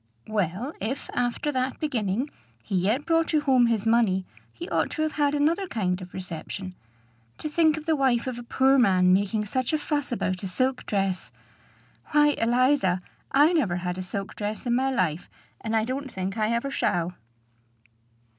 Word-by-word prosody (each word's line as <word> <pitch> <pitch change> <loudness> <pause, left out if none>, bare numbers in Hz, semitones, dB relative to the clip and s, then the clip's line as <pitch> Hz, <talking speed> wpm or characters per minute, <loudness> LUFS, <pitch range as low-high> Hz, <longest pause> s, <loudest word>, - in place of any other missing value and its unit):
"Well, 215 - -2
if, 240 +7 -4
after 245 +4 -1
that 260 -1 -2
beginning, 245 -2 -1 0.3
he 195 - -3
yet 210 +10 +1
brought 330 0 +2
you 305 - +4
home 260 -4 +4
his 225 -3 0
money, 225 -5 +3 0.3
he 115 - -8
ought 165 -1 +1
to 310 - -2
have 310 - 0
had 290 -1 +1
another 330 +7 +1
kind 185 - -1
of 180 0 -9
reception. 185 +1 -6 0.6
To - - -4
think 315 0 +3
of 310 - -7
the 320 -1 +2
wife 260 -4 +2
of 255 -2 -4
a - - -7
poor 265 +3 +3
man 185 -5 +4
making 205 +2 +1
such 255 +6 -1
a - - +4
fuss 295 -2 -2
about 185 -6 -1
a 195 - -3
silk 255 +7 0
dress! 195 -2 -1 0.8
Why, 295 0 +6
Eliza, 240 -6 +2 0.3
I 295 +5 +5
never 225 - +1
had 180 0 -3
a 185 - -4
silk 195 +2 -5
dress 210 +2 -4
in 240 - +1
my 260 +2 +2
life; 180 - -1 0.3
and 225 0 -1
I 220 0 +2
don't 265 +2 -4
think 190 +1 -3
I 215 -1 0
ever 235 +4 -1
shall." 175 -7 0
235 Hz, 185 wpm, -26 LUFS, 190-275 Hz, 0.8 s, Why